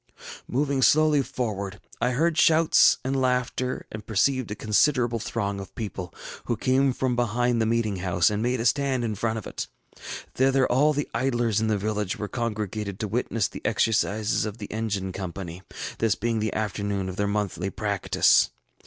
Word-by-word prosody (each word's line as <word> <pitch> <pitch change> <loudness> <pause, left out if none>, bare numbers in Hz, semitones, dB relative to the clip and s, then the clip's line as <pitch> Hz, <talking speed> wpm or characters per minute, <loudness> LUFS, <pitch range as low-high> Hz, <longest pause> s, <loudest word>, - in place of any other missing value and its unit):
ŌĆ£Moving 140 0 +1
slowly 155 0 +5
forward, 100 -7 -4 0.2
I 125 - +3
heard 160 +5 +2
shouts 160 0 +5
and 135 +1 -1
laughter, 125 0 -1
and 110 0 -7
perceived 115 +4 +1
a 105 - -3
considerable 120 +2 +2
throng 105 -4 -2
of 95 - -9
people, 95 -5 -5 0.3
who - - -1
came 135 +1 +2
from 130 -1 -1
behind 120 0 +1
the 110 - +2
meeting 115 -3 0
house 90 0 +2
and 105 0 -1
made 125 +1 0
a 115 - -2
stand 135 0 +1
in 110 -2 -1
front 110 +2 -1
of 110 - -6
it. - - -5 0.7
Thither 135 0 +3
all 145 +5 +3
the 145 0 -2
idlers 120 -3 +1
in 110 - +1
the 110 -1 +1
village 105 -1 -2
were 105 - -4
congregated 105 -4 -3
to 110 - -2
witness 115 -1 0
the - - -9
exercises 110 -1 +1
of 105 0 -4
the 105 -3 -8
engine 105 -4 -2
company, 90 -1 -6 0.4
this 115 -3 +2
being 115 0 -1
the 110 0 -1
afternoon 100 -2 -2
of 95 - -5
their 100 - +1
monthly 100 -2 -1
practice. 100 -2 +2
110 Hz, 175 wpm, -26 LUFS, 100-125 Hz, 0.7 s, slowly